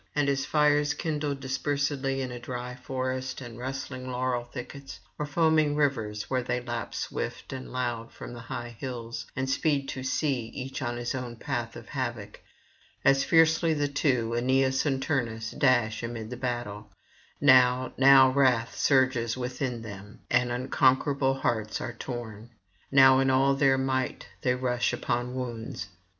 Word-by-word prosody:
And 145 -1 +2
as 135 -1 0
fires 150 -1 +3
kindled 150 -3 -2
dispersedly 135 0 -1
in 125 - -4
a 120 - -6
dry 125 +1 -5
forest 130 0 -3
and 120 -3 -9
rustling 130 0 -5
laurel 125 -1 -1
thickets, 130 +2 -9 0.2
or 150 - -2
foaming 155 -1 +3
rivers 110 -8 0
where 130 -1 0
they 125 0 -1
leap 120 -1 -5
swift - - -4
and 130 0 -7
loud 120 -2 -3
from - - -9
high 120 0 -7
hills, 120 -3 -5
and 130 0 -1
speed 140 0 +1
to 130 - -4
sea 130 -2 -1
each 130 +1 -5
in 120 -1 -2
his 120 +2 -3
own 125 -3 -5
path 120 -2 -4
of - - -10
havoc; 120 -6 -4 0.6
as 135 0 +5
fiercely 165 0 +4
the 145 -1 +1
two, 125 -5 0
Aeneas 130 +3 +2
and 135 -2 0
Turnus, 115 -6 -1
dash 120 -5 +2
amid 115 -1 -5
the - - -3
battle; 120 -5 -4 0.5
now, 130 -2 +5
now 135 -1 +7
wrath 130 -4 +2
surges 130 -3 +2
within 125 -1 -3
them, 105 0 -10
and 120 0 +3
unconquerable 135 +2 +2
hearts 110 -3 -1
are 120 - -4
torn; 115 -2 -7 0.4
now 135 -1 +7
in 135 0 +3
all 135 +1 +4
their 135 -1 +3
might 130 -1 -1 0.2
they 125 0 +2
rush 125 -1 0
upon 120 +1 -2
wounds. 115 -5 -5
130 Hz, 155 wpm, -28 LUFS, 120-135 Hz, 0.6 s, now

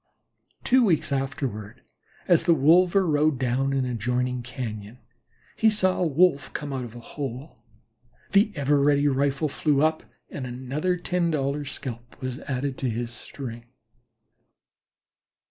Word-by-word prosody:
Two 255 0 +4
weeks 165 -9 +2
afterward, 135 -6 -3 0.5
as 175 -3 +4
the 170 -2 +5
wolver 175 +6 +4
rode 150 -2 +2
down 130 +2 0
an 135 -1 0
adjoining 125 +1 -1
cañon, 115 -3 -6 0.6
he 220 - +4
saw 185 -3 +1
a 175 - +3
Wolf 155 -1 +2
come 145 -2 -4
out 130 -1 -3
of 120 -1 -9
a - - -8
hole. 130 +2 -7 0.8
The 205 +1 +4
ever 145 0 +2
ready 145 0 +3
rifle 140 +2 +1
flew 145 0 +1
up, 155 0 +2 0.3
and 130 -3 -5
another 135 +9 -2
ten 175 -1 0
dollar 145 -1 -1
scalp 120 -3 -8
was 130 0 -4
added 135 -1 -3
to 130 - -1
his 120 +1 -3
string. 120 -1 -8
140 Hz, 140 wpm, -25 LUFS, 125-155 Hz, 0.8 s, the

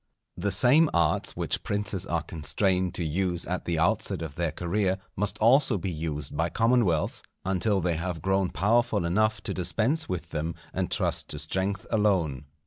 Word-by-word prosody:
The 100 +3 -1
same 130 - +5
arts 85 -3 +1
which - - -1
princes 100 -2 -2
are 85 -2 -1
constrained 90 +3 0
to 90 - -2
use 90 +2 -1
at 90 0 -3
the 85 -2 -1
outset 80 0 +1
of 80 -4 -6
their 85 0 -1
career, 95 +4 0 0.2
must 105 +1 0
also 120 0 +4
be 95 0 -3
used 75 -2 -4
by - - 0
commonwealths, 115 -9 +2 0.2
until 95 +1 +1
they 85 -2 0
have 85 0 -3
grown 95 +2 +1
powerful 110 0 +1
enough 110 +4 +1
to - - -3
dispense 115 - 0
with 85 -3 -4
them 80 +2 -2 0.2
and - - -1
trust - - 0
to 75 - -5
strength 95 +7 -2
alone. 95 - +1
95 Hz, 170 wpm, -27 LUFS, 85-105 Hz, 0.2 s, same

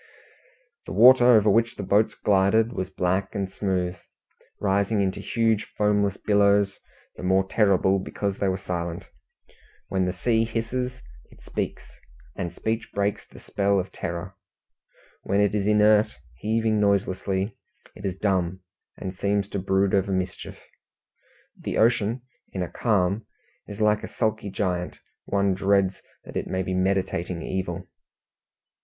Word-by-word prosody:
The - - -5
water 125 +1 +7
over 110 -4 +6
which 115 +3 +2
the 100 - -5
boats 105 +3 +2
glided 105 +4 +2
was 95 -4 -3
black 95 +1 -1
and 95 -2 -2
smooth, 90 -3 -1 0.6
rising 100 +2 +1
into 95 -1 0
huge 115 -2 +1
foamless 105 -1 +2
billows, 100 -1 +2 0.4
the - - -8
more 95 +1 +2
terrible 95 -2 +3
because 100 +1 -3
they 100 - +1
were 95 0 0
silent. 85 -1 -4 0.8
When 95 -1 +1
the 90 - 0
sea 110 +5 +1
hisses, 125 +3 -3 0.3
it - - -19
speaks, - - -5 0.4
and 85 - -3
speech 110 +1 -3
breaks 100 0 -1
the - - -16
spell 100 0 0
of 95 - -4
terror; 85 +3 -5 0.9
when 100 +1 0
it 105 0 +3
is 105 -1 0
inert, 105 0 +4 0.2
heaving 110 0 +1
noiselessly, 100 0 0 0.4
it - - -13
is 95 -2 -3
dumb, 95 -2 0 0.4
and 95 -2 -5
seems 100 +1 0
to 100 - -3
brood 95 +1 +1
over 100 0 +2
mischief. 95 -1 -3 1.0
The - - -4
ocean 115 +1 +2 0.3
in 95 - -2
a - - -3
calm 100 -2 0 0.4
is 105 +1 -8
like 105 -1 +2
a - - -4
sulky 110 -2 -1
giant; 90 -3 -2 0.3
one 100 -1 +1
dreads 95 0 +1 0.2
that - - -12
it - - -2
may 95 0 -1
be 95 - -3
meditating 90 -2 -1
evil. 95 -1 -4
100 Hz, 145 wpm, -25 LUFS, 95-105 Hz, 1.0 s, water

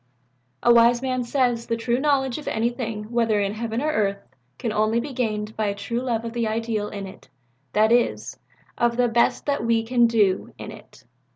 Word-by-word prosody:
"A 240 - +6
wise 235 +1 +5
man 255 -1 -1
says 245 -2 0
that 230 - -1
true 240 +1 0
knowledge 270 -2 +1
of 295 - -11
anything 225 -1 -2
whether 230 -3 +2
in 200 0 0
heaven 230 +3 -3
or 310 - +1
earth 200 -6 -1 0.3
can 230 - -3
only 215 +2 +2
be 275 +3 -5
gained 215 -3 -2
by 215 -1 -1
a 200 - -1
true 215 +4 -3
love 235 -3 -2
of 230 - -5
the 235 -2 -1
Ideal 220 -1 -2
in 200 -1 -6
it 190 - -13 0.4
that 215 +1 +3
is, 240 0 +1 0.4
of 235 0 +2
the 245 -1 +3
best 235 0 +1
that 285 -4 0
we 230 -1 +2
can 240 0 +3
do 210 -5 +1
in - - -8
it. - - -15
230 Hz, 200 wpm, -23 LUFS, 215-245 Hz, 0.4 s, A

